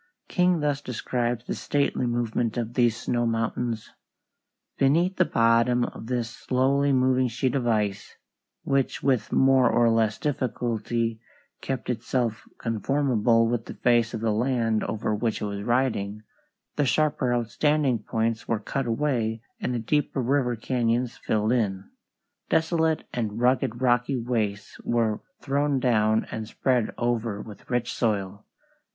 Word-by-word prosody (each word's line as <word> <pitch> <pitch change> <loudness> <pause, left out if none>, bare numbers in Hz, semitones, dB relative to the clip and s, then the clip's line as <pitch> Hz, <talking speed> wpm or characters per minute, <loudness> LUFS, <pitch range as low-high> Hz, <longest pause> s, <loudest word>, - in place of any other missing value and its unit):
King 180 -2 +2
thus 145 -1 0
describes 120 -1 -2
the - - -3
stately 140 -3 0
movement 120 -1 -1
of 120 -1 -3
these 120 -3 +2
snow 120 -1 0
mountains: 115 0 -2 0.9
"Beneath 170 +8 +3
the 185 - +4
bottom 115 0 +3
of 115 - -6
this 120 -2 -1
slowly 140 +2 +1
moving 130 -1 +3
sheet 120 +2 -1
of 130 -3 0
ice, 105 -3 -1 0.5
which 135 -1 0
with 125 -5 +1
more 135 -2 +4
or 120 -1 +3
less 110 -2 +2
difficulty 115 -4 -2 0.4
kept 135 -2 -4
itself 120 -1 -1
conformable 115 -1 +1
with 115 -1 -2
the - - -7
face 120 -1 +2
of 110 - -5
the 115 -1 +1
land 115 -1 +1
over 110 0 -2
which 110 +1 -1
it - - -3
was 100 -1 -4
riding, 110 -3 0 0.5
the 145 - +2
sharper 145 -1 +1
outstanding 130 +2 +1
points 115 +2 -2
were 115 - +1
cut 130 +5 -3
away 115 -3 -1 0.2
and - - -2
the 125 - -1
deeper 135 +5 0
river 125 -1 +1
cañons 120 +1 0
filled 110 +1 0
in. 100 -6 -1 0.6
Desolate 160 -1 +1
and 110 -2 -2
rugged 125 -1 +1
rocky 125 +2 +2
wastes 110 -4 -2
were 115 -3 0 0.2
thrown 140 0 +1
down 110 -3 +2
and 110 -1 -4
spread 125 -1 0
over 115 -3 -1
with 105 -1 -11
rich 120 -1 -1
soil." 100 -3 -2
120 Hz, 140 wpm, -26 LUFS, 110-130 Hz, 0.9 s, the